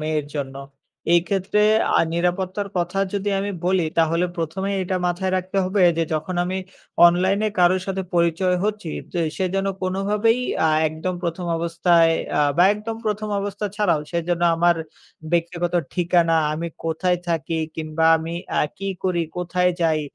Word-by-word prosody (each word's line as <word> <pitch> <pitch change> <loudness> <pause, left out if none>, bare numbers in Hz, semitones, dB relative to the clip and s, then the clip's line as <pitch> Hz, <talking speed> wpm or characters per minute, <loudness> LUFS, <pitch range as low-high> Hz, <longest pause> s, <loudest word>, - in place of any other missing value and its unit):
মেয়ের 155 -1 -1
জন্য। 135 -2 -4 0.6
এক্ষেত্রে 190 +4 0 0.4
আ - - +5
নিরাপত্তার 185 +3 -1
কথা 175 +2 -2
যদি 200 0 -2
আমি 200 +1 -2 0.2
বলি 185 -2 +2
তাহলে 165 +2 +2
প্রথমেই 190 +5 -2
এটা 185 0 -2
মাথায় 185 +2 -1
রাখতে 185 +2 -2
হবে 190 +1 +1 0.2
যে 165 - +2
যখন 155 +4 -3
আমি 185 +1 -2 0.5
অনলাইনে 190 +5 +2
কারো 180 +1 +5
সাথে 195 0 -2
পরিচয় 170 +2 +2
হচ্ছি 210 -6 -2 0.2
তো 175 - -2 0.2
সে 190 - 0
যেন 195 0 0 0.2
কোনোভাবেই 205 +5 +1 0.3
আ - - +3 0.2
একদম 160 +4 -4
প্রথম 175 +1 -3
অবস্থায় 170 0 +3 0.3
আ - - +4 0.2
বা 175 - +6
একদম 220 +2 -5
প্রথম 215 0 -2
অবস্থা 205 +1 -3
ছাড়াও 175 -8 +2
সে 170 - -1
যেন 175 -1 0 0.2
আমার 175 0 +3 0.6
ব্যক্তিগত 170 +1 0 0.2
ঠিকানা, 175 -2 +2 0.2
আমি 165 +2 -3 0.2
কোথায় 175 +2 0
থাকি 165 0 -1 0.2
কিংবা 155 0 -2
আমি 160 +1 -5 0.3
আ - - +4 0.2
কি 195 +1 -3 0.2
করি, 180 -2 +1 0.2
কোথায় 180 +1 +1
যাই 160 -2 +2
180 Hz, 155 wpm, -22 LUFS, 165-195 Hz, 0.6 s, বা